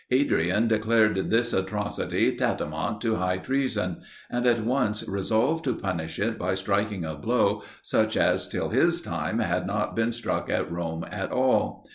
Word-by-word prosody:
Adrian 110 - +2
declared 110 -2 +2
this 115 +1 +2
atrocity 105 +2 0
tantamount 80 +8 -1
to 110 -2 +1
high 90 0 0
treason, 110 -6 -1 0.3
and 120 +1 0
at 115 -2 +2
once 115 -4 0
resolved 110 +11 +1
to 130 -5 0
punish 80 -4 -3
it 110 +2 -1
by 90 +1 0
striking 100 -1 -1
a 80 - -3
blow 75 0 +1 0.2
such - - +1
as - - +2
till - - -2
his - - +3
time - - -3
had 90 +1 0
not 105 +1 -1
been 115 +1 +1
struck 120 +1 -2
at - - -1
Rome 85 -1 -3
at - - -4
all. - - +1
105 Hz, 160 wpm, -26 LUFS, 90-115 Hz, 0.3 s, his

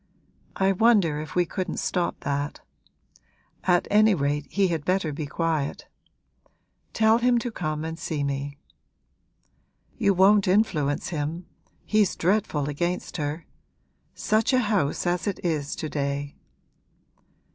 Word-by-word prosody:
I 190 0 +2
wonder 195 -7 +3
if 155 -3 -9
we 180 -1 +3
couldn't 185 +2 -4
stop 175 -1 -1
that. 145 +1 -3 1.0
At 175 -1 +3
any 215 0 +5
rate 145 -1 -1
he 195 -2 +1
had 165 -3 -2
better 180 -4 0
be 145 0 -4
quiet: 155 -1 -2 1.0
tell 220 +1 +3
him 245 0 +3
to 240 0 -2
come 155 -6 -3
and 165 +1 -5
see 150 -3 -2
me.' 140 0 -3 1.4
'You 200 - +3
won't 195 +2 +5
influence 180 -8 +1
him; 160 +2 -3 0.4
he's 215 -3 +2
dreadful 175 -6 0
against 175 +5 -2
her. 150 +2 -3 0.7
Such 220 +4 +1
a 255 - +5
house 180 -6 0
as 175 +3 0
it 200 - -2
is 150 -4 -1
to 155 - -4
day!' 140 -1 -3
170 Hz, 130 wpm, -25 LUFS, 145-195 Hz, 1.4 s, any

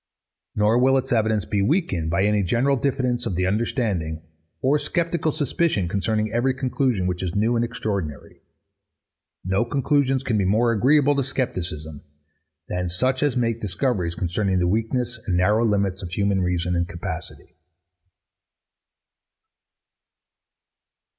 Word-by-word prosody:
Nor 105 +3 +3
will 135 +1 +4
its 130 0 -3
evidence 110 -3 +1
be 100 -2 0
weakened 100 - 0
by 85 +4 +1
any 105 0 +2
general 120 +9 +2
diffidence 125 -2 -1
of 95 - -2
the 90 +1 0
understanding, 95 - -1 0.4
or 140 +3 +2
sceptical 165 +1 -1
suspicion 145 - 0
concerning 105 +3 -1
every 130 +3 +1
conclusion 130 -6 0
which 90 -1 -2
is 90 -2 -3
new 110 +4 +2
and 115 - +2
extraordinary. 105 - -4 1.0
No 95 +4 +1
conclusions 135 +1 +1
can 110 -5 0
be - - +2
more 110 +5 +2
agreeable 140 +6 +4
to 140 - +2
scepticism 85 - -4 0.7
than 90 0 -2
such 130 +9 0
as 145 -3 +1
make 115 -1 0
discoveries 95 -4 -1
concerning 95 +2 0
the 90 -1 +2
weakness 115 +4 -1
and 90 -3 +1
narrow 105 +5 +3
limits 100 -3 0
of 90 - -6
human 100 +1 0
reason 90 0 0
and 85 0 0
capacity. 85 0 -7
110 Hz, 135 wpm, -23 LUFS, 90-130 Hz, 1.0 s, will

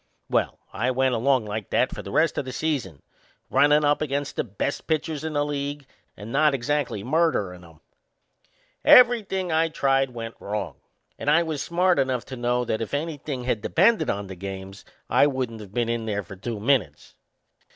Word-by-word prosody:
Well, - - +1 0.2
I 120 +6 0
went 130 0 +1
along 125 0 +2
like 105 -1 -5
that - - +1
for - - -6
the - - -9
rest - - +2
o' - - +1
the 130 - -7
season, 130 - -3 0.5
runnin' 150 +1 +4
up 145 +1 +2
against 145 -1 -2
the - - 0
best 115 +5 -4
pitchers 155 -1 -1
in 160 -1 -3
the 145 0 +1
league 145 0 -4 0.3
and 105 +3 -8
not 150 +1 +3
exactly 135 -5 -1
murderin' 120 - 0
'em. 80 -2 -17 1.0
Everything 210 -7 +5
I 160 +1 +3
tried 135 -3 +1
went 115 -2 -7
wrong, 105 0 -4 0.4
and - - -1
I 170 +3 +5
was 155 -3 -3
smart 180 -1 +2
enough 130 -3 0
to 130 - -7
know 120 0 0
that 110 - -2
if 115 +5 -3
anything 145 -4 -4
had 120 -4 -1
depended 175 - +3
on 100 0 -2
the 95 -1 -8
games 95 +1 -8 0.2
I - - +4
wouldn't 125 -5 -3
of 100 -3 -11
been 120 +1 0
in 115 -1 -2
there 105 -1 -2
for 95 +1 -10
two 110 +3 -5
minutes. 110 - 0
130 Hz, 185 wpm, -25 LUFS, 110-150 Hz, 1.0 s, Everything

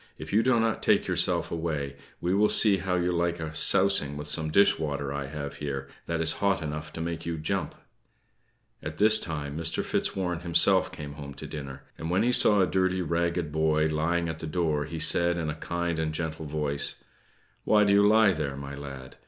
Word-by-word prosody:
If - - -8
you 110 - +4
do 120 0 +2
not 115 -1 0
take - - +2
yourself - - +1
away, 75 -4 -3 0.2
we 90 +1 -1
will 105 +2 +3
see 105 -3 +4
how 95 -1 -2
you 90 0 0
like 85 0 -1
a 80 -1 -5
sousing 75 -2 +3
of 75 +1 -5
some 80 +1 0
dish 100 +3 +4
water 70 -3 -3
I 70 -1 -4
have 70 0 -7
here, 70 -2 -5 0.2
that 85 -1 -2
is 80 - +3
hot 100 -1 +2
enough 75 +1 -5
to 80 - -6
make 85 0 -4
you 85 -1 -3
jump." 85 +4 -3 1.1
At - - -7
this 110 +1 +5
time 75 -3 -5
Mr. 85 +1 -1
Fitzwarren 90 -3 -1
himself 85 -1 +3
came 75 -1 -8
home 70 -2 -9
to - - -7
dinner; 70 -2 -8 0.2
and 80 - -5
when 95 +4 +1
he 120 - +2
saw 105 -4 +5
a - - +4
dirty 95 0 0
ragged 85 -1 -1
boy 80 0 +1
lying 85 +2 -1
at 80 -1 -5
the 80 - -6
door, 75 -3 -1
he 80 - -7
said, 85 +2 +4
in 80 -2 -2
a 75 - -10
kind 85 -1 -2
and 80 -1 -2
gentle 80 -1 -4
voice: 75 -1 -2 0.6
"Why 105 -1 +4
do 100 -1 +3
you 100 - +5
lie 110 -1 +5
there, 70 -4 -4
my 70 0 -7
lad? 70 -2 -9
80 Hz, 210 wpm, -27 LUFS, 75-90 Hz, 1.1 s, this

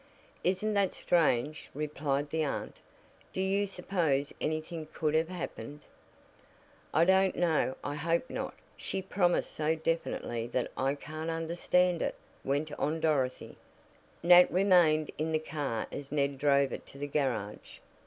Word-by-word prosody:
"Isn't 190 +4 +1
that 200 -2 +1
strange!" 150 -3 +1
replied 145 -1 -2
the 160 0 +1
aunt. 145 - -3 0.6
"Do - - -4
you 195 +2 +1
suppose 170 -7 0
anything 155 +1 -3
could 155 -1 -1
have 160 +1 +2
happened?" 150 -6 -6 1.1
"I 165 - +4
don't 190 +1 +4
know. 160 -6 +1
I 145 - -3
hope 165 - 0
not. - - -4 0.2
She - - -3
promised 185 -2 +1
so 155 +1 +1
definitely 160 -7 -2
that 125 0 -2
I 135 +2 0
can't 155 +3 -6
understand 170 +2 +1
it," - - -1 0.3
went 145 +3 -1
on 155 +3 0
Dorothy. 140 -5 0 0.7
Nat 175 +1 +8
remained 175 -5 +4
in 160 +1 -1
the - - +4
car 145 -7 -3
as 140 -1 -7
Ned 140 -2 0
drove 140 -1 +3
it - - -7
to - - -13
the 145 - -3
garage. 130 -8 -2
155 Hz, 145 wpm, -31 LUFS, 140-175 Hz, 1.1 s, Nat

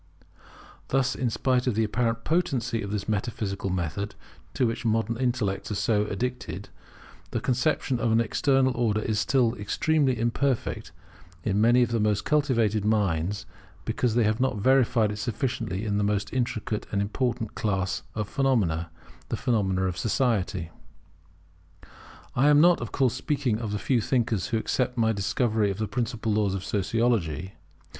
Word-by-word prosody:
Thus, 135 -1 +1
in 125 - -1
spite 125 +2 0
of 125 - +1
the 110 - +2
apparent 115 +1 -1
potency 140 -10 0
of 100 - -5
this 100 -1 -3
metaphysical 105 -2 -2
method, 90 +3 -3 0.4
to 125 - +2
which 115 -1 -2
modern 115 0 +1
intellects 115 -6 -1
are 105 - -2
so 105 0 +1
addicted, 110 -2 -4 0.6
the 120 - -2
conception 130 +1 0
of 115 - +1
an 115 - +4
External 130 +3 +2
Order 110 -3 +1
is 110 -1 -1
still 120 -1 +2
extremely 135 +5 +1
imperfect 120 +2 -1 0.5
in 105 0 +1
many 120 +2 +5
of 120 - -1
the 115 - +1
most 105 -1 +1
cultivated 115 -9 +2
minds, 100 -3 0 0.4
because 120 -3 0
they 120 - +4
have 110 +2 +1
not 130 -4 +1
verified 120 -2 +3
it 105 - -5
sufficiently 115 -2 -2
in 105 -1 0
the - - +1
most 100 -1 -1
intricate 115 -4 -2
and 100 - 0
important 115 +2 -1
class 95 -3 -1
of 105 -2 -2
phenomena, 100 - +1 0.4
the - - -2
phenomena 95 -6 +1
of 90 -1 -2
society. 105 -7 0 1.6
I 135 +4 +4
am 145 0 +6
not, 175 -1 +5
of 120 - -5
course, 130 -4 +2
speaking 135 -8 -1
of 110 -3 -4
the 105 - -1
few 120 +3 +1
thinkers 115 -5 0
who 115 - 0
accept 125 +2 -1
my 110 -1 +3
discovery 105 +1 +1
of 95 - -3
the 110 0 -2
principal 115 -2 -2
laws 105 -2 +1
of 95 - -4
Sociology. 100 - 0
115 Hz, 160 wpm, -26 LUFS, 105-125 Hz, 1.6 s, am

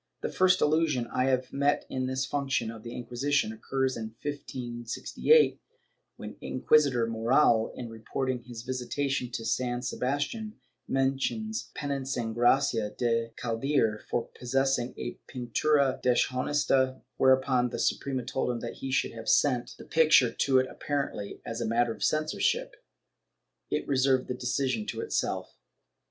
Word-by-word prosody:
The - - -2
first 185 0 +3
allusion 150 -5 +2
I 125 - +2
have 130 -1 0
met 145 +1 +1
to 130 - -3
this 130 +1 -1
function 135 -5 -1
of 115 -1 -10
the 115 +2 -8
Inquisition 125 0 0
occurs 130 +4 -1
in 110 -1 -6
1568, 130 - +1 0.5
when - - -9
Inquis 150 -1 +3
itor 120 -3 0
Moral, 115 0 +3
in 120 - -6
reporting 125 +3 -3
his 120 -1 -9
visitation 130 +1 -2
of 115 - -7
San 120 +1 -1
Sebastian, 145 - -2 0.3
mentions 135 +12 -1
penancing 135 -5 -2
Gracia 120 -2 +3
de 115 -1 +1
Caldiere 115 -2 0
for 120 - 0
possessing 130 0 0
a 120 - -5
pintura 135 +3 +1
deshonesta, 130 +1 +1 0.2
whereupon 130 -1 +3
the - - -5
Suprema 130 -3 -1
told 130 0 -1
him 120 -1 -1
that 120 - -6
he 135 - -5
should 130 - +1
have 115 -1 -5
sent 125 -4 +2
the - - -11
picture 155 -7 +5
to 135 -2 +2
it 130 - +4
— - - -12
apparently, 140 -8 -3
as 115 - -4
a - - 0
matter 115 +1 +2
of 105 - -7
censorship, 315 - 0 0.9
it - - -2
reserved 130 -1 +2
the - - -2
decision 135 - -1
to - - -4
itself. 450 - -2
130 Hz, 145 wpm, -29 LUFS, 120-140 Hz, 0.9 s, picture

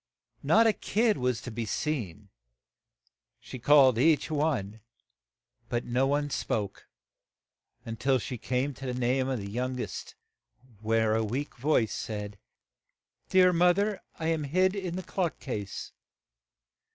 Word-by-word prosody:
Not 230 - +4
a 225 - +5
kid 215 0 +1
was 125 -2 -1
to 125 - -6
be 115 +1 -3
seen; 105 - -3 1.1
she 120 +2 -9
called 130 -1 +6
each 155 +2 +3
one; 130 -9 -1 0.9
but 120 0 -1
no 125 +3 +1
one 145 +1 0
spoke 100 -6 -3 1.1
till 135 0 +3
she 125 0 -5
came 130 +4 -1
to 135 +1 -8
the 125 0 -3
name 130 +2 +1
of 130 - -1
the 100 -2 -6
young 125 +3 -2
est, - - -6 0.6
when 110 +1 +1
a 110 +1 +2
weak 130 +7 -3
voice 125 -4 +1
said, 105 -2 -5 0.9
"Dear 185 -1 +5
moth 175 +1 +4
er, 205 0 0 0.2
I 160 0 -1
am 160 -2 0
hid 185 +6 +2
in 185 -3 -3
the 185 - -4
clock 180 -3 -2
case." 105 -7 -5
130 Hz, 140 wpm, -28 LUFS, 115-160 Hz, 1.1 s, called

